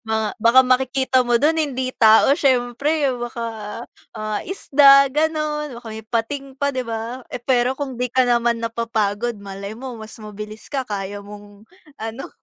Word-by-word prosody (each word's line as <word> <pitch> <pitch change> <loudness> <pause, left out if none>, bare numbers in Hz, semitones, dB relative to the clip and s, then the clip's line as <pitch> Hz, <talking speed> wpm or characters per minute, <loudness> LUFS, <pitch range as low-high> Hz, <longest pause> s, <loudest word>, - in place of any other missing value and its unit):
Baka 220 -1 -1
baka 230 +4 +6
makikita 260 0 +2
mo 240 0 +3
dun 315 +3 +3
hindi 260 -4 -1
tao 220 +3 +6
siyempre, 275 +3 +1
baka, 240 -1 -5 0.7
ah, 215 -1 -3
isda 275 -6 +5
ganun, 300 -2 -1
baka 240 - -16
may 220 0 -8
pating 235 +5 -2
pa 280 - +1
'di 255 -1 -2
ba? 230 +3 -5
Eh - - -4
pero 250 0 +2
kung 265 -4 -4
di 250 - -1
ka 260 - +4
naman 235 -1 +2
napapagod 230 -1 -1
malay 200 0 -7
mo 255 -1 -7
mas 220 0 -10
mabilis 210 0 -9
ka 270 -3 -2
kaya 200 -1 -5
mong 205 0 -13 0.3
ano. 225 +5 -6
240 Hz, 160 wpm, -21 LUFS, 220-270 Hz, 0.7 s, baka